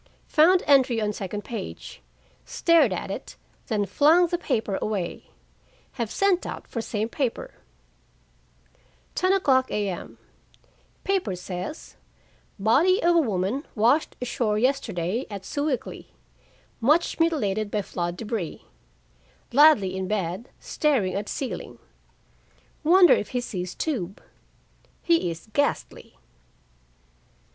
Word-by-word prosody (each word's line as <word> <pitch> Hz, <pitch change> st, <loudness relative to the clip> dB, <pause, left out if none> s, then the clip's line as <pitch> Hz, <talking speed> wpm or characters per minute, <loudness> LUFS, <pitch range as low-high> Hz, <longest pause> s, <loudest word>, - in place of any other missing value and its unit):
Found 350 Hz, +4 st, +5 dB
entry 265 Hz, -4 st, +4 dB
on 210 Hz, -1 st, -1 dB
second 205 Hz, +1 st, -5 dB
page, 220 Hz, -4 st, -7 dB, 0.4 s
stared 335 Hz, -1 st, +3 dB
at -, -, -4 dB
it, -, -, -7 dB, 0.3 s
then 210 Hz, -3 st, 0 dB
flung 305 Hz, -, +4 dB
the 345 Hz, 0 st, -1 dB
paper 220 Hz, -, -1 dB
away. 195 Hz, -5 st, -3 dB, 0.6 s
Have 235 Hz, -4 st, -4 dB
sent 390 Hz, -, +1 dB
out -, -, -6 dB
for 230 Hz, -, -4 dB
same 215 Hz, -1 st, -2 dB
paper. 270 Hz, -, -3 dB, 1.6 s
10:00 365 Hz, -9 st, +3 dB
A.M. 200 Hz, -4 st, -4 dB, 0.9 s
Paper 375 Hz, -, 0 dB
says: 180 Hz, -, -7 dB, 0.6 s
"Body 290 Hz, -, +3 dB
of 345 Hz, 0 st, +4 dB
woman 210 Hz, +4 st, -1 dB
washed 240 Hz, +8 st, +2 dB
ashore 235 Hz, -3 st, -1 dB
yesterday 225 Hz, -4 st, -1 dB
at 200 Hz, -2 st, -7 dB
Sewickley. 285 Hz, -3 st, -3 dB, 0.7 s
Much 300 Hz, +10 st, +2 dB
mutilated 215 Hz, -11 st, +1 dB
by 205 Hz, -1 st, -1 dB
flood 175 Hz, -2 st, -4 dB
débris." 215 Hz, -7 st, -4 dB, 0.9 s
Ladley 250 Hz, -10 st, +5 dB
in 190 Hz, 0 st, -3 dB
bed, 190 Hz, +2 st, -3 dB
staring 255 Hz, -12 st, 0 dB
at 200 Hz, +1 st, -3 dB
ceiling. 270 Hz, -, -5 dB, 1.1 s
Wonder 355 Hz, +3 st, +7 dB
if -, -, -1 dB
he -, -, +2 dB
sees 185 Hz, -6 st, -5 dB
tube? 200 Hz, -, -3 dB, 0.8 s
He 335 Hz, -, +2 dB
is 165 Hz, +5 st, -8 dB
ghastly. 285 Hz, 0 st, -2 dB
230 Hz, 110 wpm, -25 LUFS, 195-300 Hz, 1.6 s, Wonder